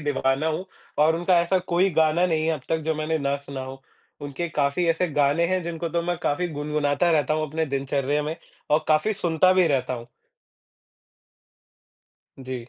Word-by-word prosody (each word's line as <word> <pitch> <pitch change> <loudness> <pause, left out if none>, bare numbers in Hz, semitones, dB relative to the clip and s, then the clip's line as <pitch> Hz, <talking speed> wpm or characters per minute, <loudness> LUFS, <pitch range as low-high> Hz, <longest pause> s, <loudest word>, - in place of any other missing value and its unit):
दीवाना 140 0 0
हूँ 160 +4 -2 0.4
और 160 +1 +3
उनका 175 +1 +3
ऐसा 175 +2 +1
कोई 180 +2 +1
गाना 160 +2 +3
नहीं 160 -2 0
है 165 - +2
अब 150 - -7
तक 160 - +1
जो 160 0 0
मैंने 155 +1 -1
ना 140 -1 0
सुना 140 -1 -8
हो। 135 0 -9 0.4
उनके 145 +4 -4
काफ़ी 145 +3 0
ऐसे 165 +2 +1
गाने 145 +4 +2
हैं 185 0 0
जिनको 170 0 -4
तो 170 +1 -1
मैं 175 0 -1
काफ़ी 175 +5 0
गुनगुनाता 150 +2 0
रहता 155 -1 +2
हूँ 155 0 -1
अपने 160 +2 -2
दिनचर्या 140 +1 -1
में 155 +2 -4 0.3
और 155 +1 +3
काफ़ी 155 +8 +3
सुनता 180 -1 +2
भी 185 -2 +4
रहता 135 -4 0
हूँ। 120 0 -9 2.3
जी। 130 -2 -7
155 Hz, 180 wpm, -24 LUFS, 140-170 Hz, 2.3 s, भी